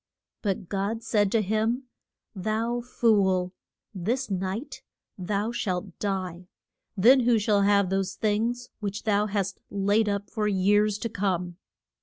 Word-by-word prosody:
But 195 -3 -2
God 205 +4 -2
said 205 -4 +2
to 225 -2 +2
him, 220 +5 0 0.5
Thou 220 +4 -1
fool, 195 -7 +2 0.4
this 220 +6 -2
night 195 +9 -3 0.3
thou 205 +4 -2
shalt 185 -5 -3
die. 185 -3 -3 0.5
Then 245 +8 +7
who 240 -2 +3
shall 205 -1 +2
have 200 -2 +3
those 195 0 -1
things 230 +3 -1
which 205 -2 -4
thou 210 -1 +2
hast 195 -2 -2
laid 205 +2 +2
up 200 0 -3
for 215 -2 -1
years 205 +1 +3
to 230 +2 -3
come? 180 -4 -2
205 Hz, 135 wpm, -27 LUFS, 190-220 Hz, 0.5 s, Then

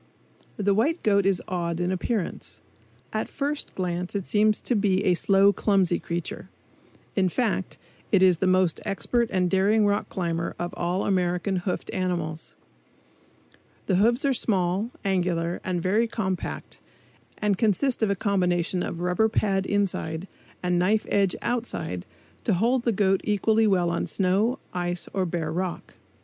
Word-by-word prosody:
The 200 -1 +2
white 290 - +1
goat 200 -2 +3
is 190 -3 +1
odd 170 -3 -2
in 180 +1 0
appearance. 190 +1 -3 0.5
At - - -2
first 290 +1 -3
glance 180 0 -3
it 195 -2 -2
seems 215 0 +2
to 245 - 0
be 200 -2 +2
a 185 - +4
slow, 195 +3 +4
clumsy 195 -5 +2
creature; 170 0 -5 0.7
in 190 -2 +2
fact, 210 -2 -1 0.3
it 195 -2 +5
is 180 -3 +5
the 190 - +1
most 185 -2 +3
expert 215 +5 0
and 185 -2 +2
daring 200 +4 +3
rock 205 0 0
climber 170 -3 -2
of 175 0 -4
all 175 +2 -1
American 180 0 0
hoofed 180 0 -3
animals. 170 -4 -2 1.3
The 185 - +2
hoofs 235 +7 +3
are 275 - +3
small, 195 -2 0 0.2
angular 175 -3 0
and 180 -2 -2
very 215 +5 +2
compact 190 -5 -4 0.6
and 210 -1 +1
consist 230 +6 +1
of 220 - +2
a 200 - +1
combination 180 -2 0
of 170 - -4
rubber 180 +5 +2
pad 195 -3 0
inside 190 -4 -1 0.4
and 180 -1 +1
knife 210 +5 +2
edge 195 -2 +2
outside 235 - -3 0.4
to - - +2
hold 235 +6 +1
the 235 - +3
goat 195 -2 +2
equally 215 +2 +2
well 180 -4 +2
on 170 - -1
snow, 200 +6 +1 0.2
ice 175 0 -3
or 190 -2 0
bare 165 -2 -2
rock. 180 +1 -4
190 Hz, 155 wpm, -25 LUFS, 175-210 Hz, 1.3 s, it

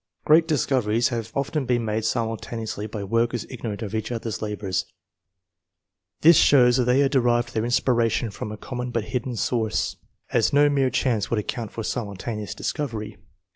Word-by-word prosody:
Great 160 +2 +5
discoveries 120 -6 +1
have 115 -3 -4
often 140 0 -1
been 120 -2 +1
made 110 0 -1
simultaneously 110 -1 -3
by 105 -1 -5
workers 115 +3 0
ignorant 115 -4 -5
of 105 - -6
each 110 +2 -2
other's 115 -2 -4
labours. 100 -4 -2 1.3
This 165 0 +7
shows 125 -3 +6
that 125 - +2
they 125 +3 +4
had 140 -1 +2
derived 120 -3 +2
their 110 0 0
inspiration 120 -2 +1
from 105 - -6
a 110 - -6
common 125 +1 -5
but 115 -2 -1
hidden 125 +2 -3
source, 110 -1 -1 0.4
as - - +3
no 145 +1 +5
mere 135 -2 +2
chance 115 -6 0
would 115 - 0
account 110 +1 -3
for 115 - -5
simultaneous 105 -1 -4
discovery. 110 -8 -4
115 Hz, 165 wpm, -24 LUFS, 110-125 Hz, 1.3 s, This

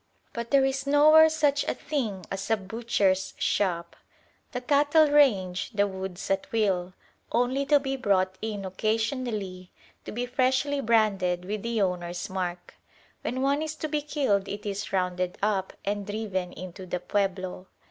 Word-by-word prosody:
But 235 -1 -5
there 275 -1 +5
is 270 +1 -2
nowhere 310 +2 +7
such 295 -2 +2
a - - -1
thing 225 - -3
as 195 +2 -4
a 225 - +3
butcher's 200 -2 0
shop. 175 -4 0 0.6
The 250 - -3
cattle 290 +3 +4
range 195 -11 +3
the 205 0 +3
woods 190 -1 -5
at 195 0 -1
will, 190 -5 0 0.4
only 255 +4 +1
to 295 -1 +5
be 270 -1 -2
brought 190 -5 +1
in 210 -3 -4
occasionally 215 -2 -2 0.4
to - - -6
be 245 +3 -2
freshly 260 +3 +1
branded 200 -6 +2
with 210 +2 -3
the 230 -2 0
owner's 175 -1 -3
mark. 180 -2 -4 0.5
When 260 +1 -2
one 280 +2 +2
is 315 0 -3
to 310 - -4
be 300 0 -1
killed 265 -10 0
it 205 +1 -6
is 200 0 -4
"rounded 180 -1 -1
up" 200 -2 0
and 205 0 -1
driven 200 -4 -3
in 180 -1 -8
to 190 0 -10
the 180 - -2
pueblo. 185 -1 -2
210 Hz, 160 wpm, -27 LUFS, 185-265 Hz, 0.6 s, nowhere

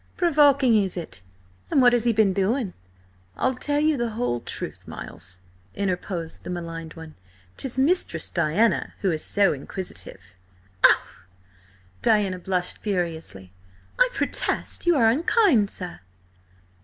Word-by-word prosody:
"Provoking, 285 -7 +4
is 190 -1 -2
it? 165 - -7 0.5
And - - +2
what 245 -2 +6
has 240 -1 +1
he 235 - +4
been 215 -3 +3
doing?" 200 +2 0 0.6
"I'll 260 - +1
tell 290 +3 -1
you 305 -1 +2
the 240 -1 -1
whole 220 - -2
truth, - - -4
Miles," 90 0 -9 0.3
interposed 180 -3 -3
the - - -8
maligned 165 -2 -6
one. 160 -1 -10 0.4
"'Tis 260 -2 -3
Mistress 325 +8 +2
Diana 210 +10 +1
who 195 - +1
is 155 -1 -2
so 200 -2 +2
inquisitive!" 175 +6 -7 0.6
"Oh!" - - +6 1.0
Diana 200 -4 +2
blushed 180 0 -2
furiously 165 - -4 0.5
"I - - +5
protest 350 - -1
you 345 - +5
are 235 -6 +4
unkind, 280 - +3
sir!" 85 - -7
205 Hz, 130 wpm, -24 LUFS, 175-260 Hz, 1.0 s, what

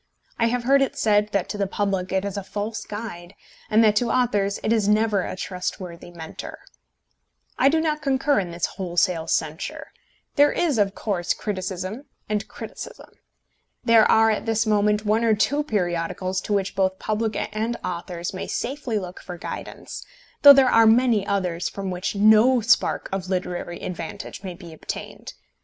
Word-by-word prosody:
I 230 - +3
have 245 +1 -1
heard 275 +3 +4
it 270 - 0
said 210 -1 +2
that 200 -3 0
to 210 - -5
the 200 - +1
public 195 -2 -2
it 190 +1 0
is 200 - -4
a 200 - -2
false 210 +3 -4
guide, 205 -5 -7 0.3
and 220 +2 +5
that 210 -1 +4
to 235 +2 +1
authors 205 -5 +1
it 220 - +2
is 215 -3 +1
never 210 -1 +3
a - - -4
trustworthy 180 -2 -5
Mentor. 165 -2 -8 1.0
I 270 - +6
do 320 +2 +2
not 305 -1 -1
concur 275 0 +2
in 180 -3 -3
this 170 0 -2
wholesale 175 -2 -1
censure. 160 +3 -3 0.5
There 290 +1 +6
is, 310 -9 0
of 200 -1 +1
course, 185 -5 -1
criticism 190 +4 -4 0.2
and 210 -1 -2
criticism. - - -9 0.7
There 230 -3 +5
are 225 0 +5
at 215 - -3
this 225 0 +1
moment 210 0 +2
one 215 +2 +2
or 225 -2 +4
two 285 +8 +1
periodicals 185 - -2
to 210 - -1
which 200 0 -1
both 190 -1 +1
public 215 +1 -2 0.2
and 225 +2 -1
authors 175 0 -4
may 185 - -5
safely 255 -3 -3
look 185 -2 -6
for 180 -2 -8
guidance, - - -7 0.4
though 285 -1 +11
there 270 -1 +5
are 225 -2 +5
many 225 -3 +4
others 180 -3 -1
from 195 -1 -5
which 180 +3 -3
no 220 +5 +5
spark 230 +1 +2
of 190 -1 -3
literary 180 -2 -3
advantage 170 +1 -6
may 185 -3 -6
be 170 -3 -11
obtained. 160 - -7
205 Hz, 175 wpm, -23 LUFS, 185-225 Hz, 1.0 s, though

